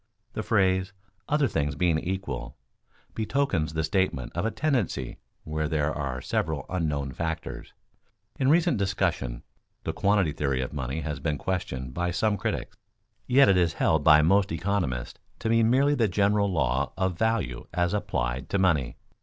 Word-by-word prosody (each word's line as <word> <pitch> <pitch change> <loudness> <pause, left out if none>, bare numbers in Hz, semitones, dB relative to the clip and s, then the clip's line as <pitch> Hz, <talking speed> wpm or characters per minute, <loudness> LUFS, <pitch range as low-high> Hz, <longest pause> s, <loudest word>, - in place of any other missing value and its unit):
The - - -2
phrase 95 -3 +1 0.4
"other 150 -1 +3
things 75 - -1
being 85 0 +2
equal" 90 -9 -4 0.6
betokens 110 - 0
the 80 - 0
statement 95 -8 0
of - - 0
a - - +1
tendency 115 - -1 0.2
where 80 0 -2
there 75 -1 0
are 65 -3 -3
several 80 0 -2
unknown 75 -6 -1
factors. 80 +2 -5 0.7
In 135 -1 +3
recent 170 -3 +3
discussion 90 -11 -1 0.4
the - - -2
quantity 100 -5 +2
theory 70 -2 -1
of 65 - -6
money 70 +2 -3
has 75 -1 -4
been 75 0 -1
questioned 65 -7 -3
by 90 +4 -1
some 105 +4 +1
critics; - - -3 0.5
yet 135 +2 +6
it 95 - +5
is 85 -2 +2
held 80 -2 +2
by 75 0 +7
most 95 +3 +3
economists 80 -8 -2 0.2
to 115 - -3
be 115 0 +4
merely 130 +6 +4
the 120 -6 +2
general 100 +1 +2
law 65 -4 0
of 95 -2 0
value 110 - -1
as 90 +1 0
applied 65 -11 -2
to 100 - +1
money. 80 -9 +1
85 Hz, 160 wpm, -27 LUFS, 75-100 Hz, 0.7 s, by